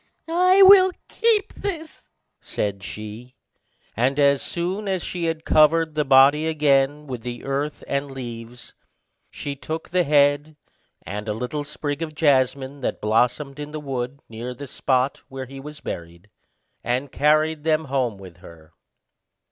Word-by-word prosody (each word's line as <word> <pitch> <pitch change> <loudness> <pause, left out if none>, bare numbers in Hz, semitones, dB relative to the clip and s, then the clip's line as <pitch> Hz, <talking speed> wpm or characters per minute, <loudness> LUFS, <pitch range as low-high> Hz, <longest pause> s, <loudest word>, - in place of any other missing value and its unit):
"I 365 +3 +5
will 380 -1 +8 0.2
keep 435 -3 +1
this," 330 -6 -6 0.3
said 100 -1 -3
she; 110 +5 -8 0.6
and 130 +5 +1
as 140 -1 +4
soon 185 +4 -3
as 190 -3 -1
she 175 -2 -3
had 165 -1 -3
covered 160 +1 +4
the 150 0 +1
body 140 +3 +5
again 145 -1 +2
with 125 -4 -6
the 120 0 -6
earth 140 +2 -3
and 140 0 -2
leaves, 120 -2 -8 0.6
she 140 -1 -6
took 155 +4 -6
the 180 0 +2
head 145 0 +2 0.5
and 105 +2 -6
a - - 0
little 125 +6 -3
sprig 145 0 -5
of 155 -2 -5
jasmine 140 -2 +1
that - - -2
bloomed 125 +6 0
in 145 0 -5
the 155 0 -6
wood, 135 -1 -5
near 120 +3 -7
the 140 - -8
spot 130 0 0
where 135 0 -7
he 135 +2 -10
was 150 +2 -10
buried, 85 +4 -8 0.5
and 125 +3 -2
carried 155 +1 +2
them 160 0 +1
home 130 -6 -1
with 95 -3 -12
her. 85 -3 -15
140 Hz, 150 wpm, -23 LUFS, 125-155 Hz, 0.6 s, will